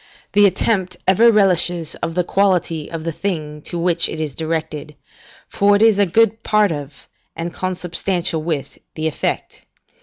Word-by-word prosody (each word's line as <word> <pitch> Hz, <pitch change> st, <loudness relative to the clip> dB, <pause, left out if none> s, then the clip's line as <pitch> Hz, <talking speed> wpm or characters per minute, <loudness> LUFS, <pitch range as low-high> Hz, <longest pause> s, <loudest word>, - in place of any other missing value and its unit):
The 205 Hz, 0 st, +6 dB
attempt 185 Hz, -1 st, -1 dB
ever 225 Hz, +5 st, +6 dB
relishes 180 Hz, -5 st, +2 dB
of 165 Hz, -, -3 dB
the 180 Hz, -, +2 dB
quality 175 Hz, -5 st, 0 dB
of 165 Hz, -1 st, -6 dB
the 165 Hz, -, -2 dB
thing 155 Hz, -4 st, -4 dB
to 175 Hz, -, -4 dB
which 170 Hz, -1 st, +1 dB
it 160 Hz, -, -6 dB
is 155 Hz, -3 st, -3 dB
directed, 155 Hz, -2 st, -4 dB, 0.5 s
for 205 Hz, 0 st, +3 dB
it 205 Hz, -, +1 dB
is 220 Hz, -3 st, +4 dB
a 200 Hz, -, +4 dB
good 225 Hz, +4 st, +2 dB
part 210 Hz, -3 st, +2 dB
of, 145 Hz, -2 st, -7 dB, 0.3 s
and 170 Hz, +1 st, -5 dB
consubstantial 180 Hz, -2 st, -2 dB
with, 155 Hz, -3 st, -4 dB, 0.2 s
the 155 Hz, -, -4 dB
effect. 160 Hz, -, -3 dB
175 Hz, 160 wpm, -19 LUFS, 160-195 Hz, 0.5 s, The